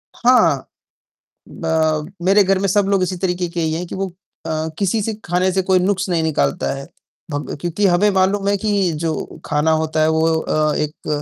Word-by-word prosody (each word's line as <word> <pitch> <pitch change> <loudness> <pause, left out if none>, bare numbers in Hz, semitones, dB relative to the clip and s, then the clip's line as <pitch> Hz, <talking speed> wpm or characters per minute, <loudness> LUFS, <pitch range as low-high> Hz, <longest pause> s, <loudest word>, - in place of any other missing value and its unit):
हाँ, 250 +1 +3 0.8
ब 160 0 -1
मेरे 200 +2 +5
घर 195 0 +2
में 200 - 0
सब 200 +1 +2
लोग 195 -2 +2
इसी 185 0 -2
तरीक़े 180 -1 -1
के 170 - -5
ही 160 -1 0
हैं, 175 +2 -3
कि - - -6
वो 195 0 -2 0.4
अ, 160 0 -2
किसी 205 +2 +1
से 220 +2 -2
ख़ाने 180 +2 +1
से 190 +1 +1
कोई 185 0 +2
नुक्स 195 +2 0
नहीं 165 -2 +1
निकालता 70 - 0
है। 135 0 -7 0.5
भग 145 0 -4
क्योंकि 175 +4 -1
हमें 190 +3 +3
मालूम 195 +1 +1
है 200 - +3
कि 200 -3 +1
जो 160 -2 -3
ख़ाना 150 +2 +1
होता 155 0 0
है 155 - +3
वो 160 +1 +2
अ, 155 -1 0
एक 150 0 -4
180 Hz, 200 wpm, -19 LUFS, 160-195 Hz, 0.8 s, मेरे